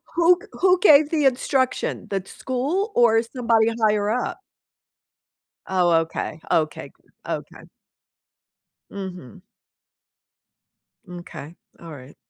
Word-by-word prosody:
Who 345 Hz, +1 st, +5 dB
g -, -, -14 dB, 0.2 s
Who 365 Hz, -1 st, +4 dB
gave 300 Hz, -6 st, +6 dB
the 305 Hz, -3 st, 0 dB
instruction, 260 Hz, 0 st, 0 dB
the 195 Hz, -, -1 dB
d 190 Hz, -, -18 dB
school 295 Hz, -, -2 dB
or 225 Hz, -2 st, +4 dB
somebody 230 Hz, -2 st, +1 dB
higher 210 Hz, -1 st, +2 dB
up? 250 Hz, -, -2 dB, 1.3 s
Oh, 180 Hz, -2 st, +2 dB
okay. 160 Hz, -1 st, -5 dB
Okay, 155 Hz, -2 st, -1 dB
good. -, -, -33 dB, 0.2 s
Okay. -, -, -6 dB, 1.3 s
Mhm. 185 Hz, -, -9 dB, 1.7 s
M'kay. 175 Hz, -3 st, -10 dB, 0.2 s
All 165 Hz, -1 st, -11 dB
right. 135 Hz, -2 st, -12 dB
225 Hz, 105 wpm, -22 LUFS, 180-280 Hz, 1.7 s, gave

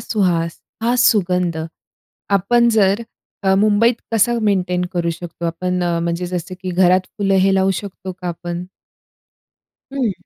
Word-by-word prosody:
सुहास, 175 Hz, -6 st, 0 dB, 0.2 s
हा 240 Hz, +2 st, +2 dB
सुगंध, 180 Hz, -4 st, +2 dB, 0.8 s
आपण 235 Hz, +5 st, +3 dB
जर 210 Hz, 0 st, +2 dB, 0.4 s
अ, 190 Hz, 0 st, +3 dB
मुंबईत 215 Hz, +4 st, +3 dB, 0.2 s
कसा 225 Hz, +2 st, +3 dB
मेंटेन 180 Hz, -4 st, +1 dB
करू 170 Hz, -1 st, 0 dB
शकतो 170 Hz, 0 st, -6 dB
आपण 180 Hz, +2 st, -1 dB
अ, 170 Hz, -1 st, 0 dB
म्हणजे 170 Hz, +1 st, -2 dB
जसं 180 Hz, +1 st, -4 dB
की 185 Hz, -1 st, -3 dB
घरात 185 Hz, +1 st, +4 dB, 0.2 s
फुलं 195 Hz, -1 st, +1 dB
हे 195 Hz, -, +3 dB
लावू 190 Hz, 0 st, +3 dB
शकतो 190 Hz, -2 st, -7 dB
का 180 Hz, -, -4 dB
आपण? 175 Hz, +1 st, -5 dB, 1.3 s
हं. 255 Hz, -7 st, 0 dB
185 Hz, 140 wpm, -19 LUFS, 175-205 Hz, 1.3 s, घरात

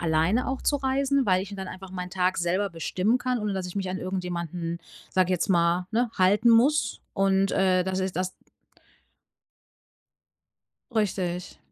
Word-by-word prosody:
alleine 165 Hz, +8 st, +1 dB
auch 265 Hz, 0 st, -3 dB
zu 290 Hz, -, +2 dB
reisen, 275 Hz, 0 st, +1 dB
weil 185 Hz, -1 st, +3 dB
ich 195 Hz, -, -8 dB
mir 200 Hz, -, -7 dB
dann 190 Hz, -1 st, -5 dB
einfach 185 Hz, 0 st, -9 dB, 0.2 s
Tag 185 Hz, 0 st, 0 dB
selber 185 Hz, +4 st, 0 dB
bestimmen 185 Hz, +7 st, 0 dB
kann, 250 Hz, 0 st, -1 dB
ohne 210 Hz, -2 st, -2 dB
dass 190 Hz, -1 st, -3 dB
ich 180 Hz, -, -8 dB
mich 195 Hz, -2 st, -2 dB
an 185 Hz, -, -3 dB
irgendjemanden, 175 Hz, -2 st, -4 dB, 0.3 s
sage 185 Hz, -1 st, +3 dB
ich -, -, -2 dB
jetzt 180 Hz, +2 st, 0 dB
mal, 175 Hz, 0 st, +2 dB
ne, 235 Hz, +1 st, +1 dB
halten 205 Hz, +5 st, +4 dB
muss 260 Hz, +7 st, +3 dB
und, 195 Hz, 0 st, +2 dB
äh, 185 Hz, -1 st, +3 dB
das 190 Hz, 0 st, -2 dB
ist 185 Hz, -2 st, -3 dB
das 185 Hz, 0 st, -1 dB, 2.6 s
Richtig. 185 Hz, -5 st, -2 dB
190 Hz, 165 wpm, -26 LUFS, 180-215 Hz, 2.6 s, halten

